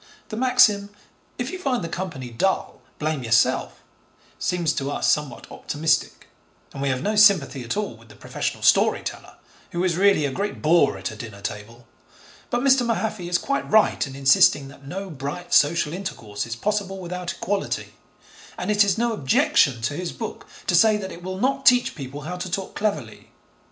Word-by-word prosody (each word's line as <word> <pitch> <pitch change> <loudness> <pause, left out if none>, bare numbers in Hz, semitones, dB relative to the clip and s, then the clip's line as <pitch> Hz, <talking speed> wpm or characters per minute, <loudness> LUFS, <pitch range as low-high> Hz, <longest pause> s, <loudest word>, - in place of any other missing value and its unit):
The 215 - -5
maxim, 230 -5 +4 0.5
'If 245 +4 -3
you 370 - -6
find 260 - -1
the - - -3
company 165 -8 -5
dull, 190 +12 -1 0.2
blame 155 -2 -2
yourself,' 115 -1 +1 0.6
seems 170 -3 0
to 140 -2 -3
us - - +1
somewhat 150 -5 -2
optimistic, 155 +2 -1 0.5
and 135 - -6
we 140 - 0
have 130 -1 -1
no 215 +1 0
sympathy 190 - +4
at 120 - -3
all 210 - -3
with 115 0 -19
the 105 - -14
professional - - -4
story - - +4
teller - - -7 0.4
who 175 +1 -1
is 175 -2 +1
really 195 -5 +4
a 140 - -1
great 200 +8 -3
bore 165 +3 +3
at - - -4
a - - -9
dinner 110 -6 -9
table; 105 +4 -7 0.6
but 240 - 0
Mr. 265 -1 +4
Mahaffy 220 -6 -2
is 175 - +2
quite 280 +7 -2
right 215 -7 +3
in 135 - -9
insisting 135 0 +4
that 140 0 -15
no 190 +4 -6
bright 150 +5 -6
social 150 +1 +3
intercourse 115 - -5
is 115 - -4
possible 200 - -2
without 180 -1 -5
equality, 200 0 -3 0.6
and - - -2
it 210 0 +5
is 205 +2 +1
no 235 0 +1
objection 130 - +2
to 120 - 0
his 175 +3 -4
book - - -7 0.2
to - - 0
say 220 -1 +5
that 190 -2 -6
it 170 - -10
will 185 +1 -5
not 270 +5 0
teach 245 0 +5
people 140 -1 -8
how 175 +5 -5
to 180 +1 -5
talk 190 +1 -4
cleverly. 200 - -3
175 Hz, 185 wpm, -23 LUFS, 140-210 Hz, 0.6 s, it